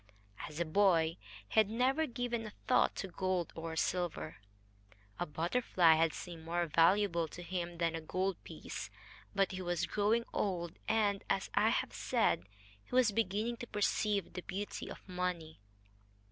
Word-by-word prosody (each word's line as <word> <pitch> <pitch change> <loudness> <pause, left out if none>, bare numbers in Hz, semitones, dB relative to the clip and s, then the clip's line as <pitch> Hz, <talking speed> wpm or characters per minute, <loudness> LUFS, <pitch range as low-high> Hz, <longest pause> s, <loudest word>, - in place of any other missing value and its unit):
As 155 +1 -8
a 170 - +1
boy 165 -2 +3 0.3
he - - +3
had 215 -2 +4
never 260 +7 +2
given 240 -2 -2
a 210 - -10
thought - - +3
to 195 - -3
gold 185 -1 -1
or 165 0 -5
silver. 175 - -1 0.8
A 175 - -1
butterfly 170 +1 +3
had 160 0 +3
seemed 170 0 -8
more 170 +1 0
valuable 170 +1 +3
to 175 +3 -9
him 175 -1 -4
than 165 -1 +1
a 165 - -3
gold 185 +4 -2
piece. - - -7 0.5
But 195 -1 +3
he 185 0 -4
was 175 -2 0
growing 215 +3 +1
old, 175 -4 -2
and, 205 -3 +2
as 195 - 0
I - - +4
have - - 0
said, 90 - +1 0.4
he - - -6
was 250 -4 +5
beginning 220 +3 0
to 240 - -7
perceive 205 -2 0
the 180 - -4
beauty 200 +3 -5
of - - -10
money. 180 -3 -3
185 Hz, 160 wpm, -34 LUFS, 165-210 Hz, 0.8 s, was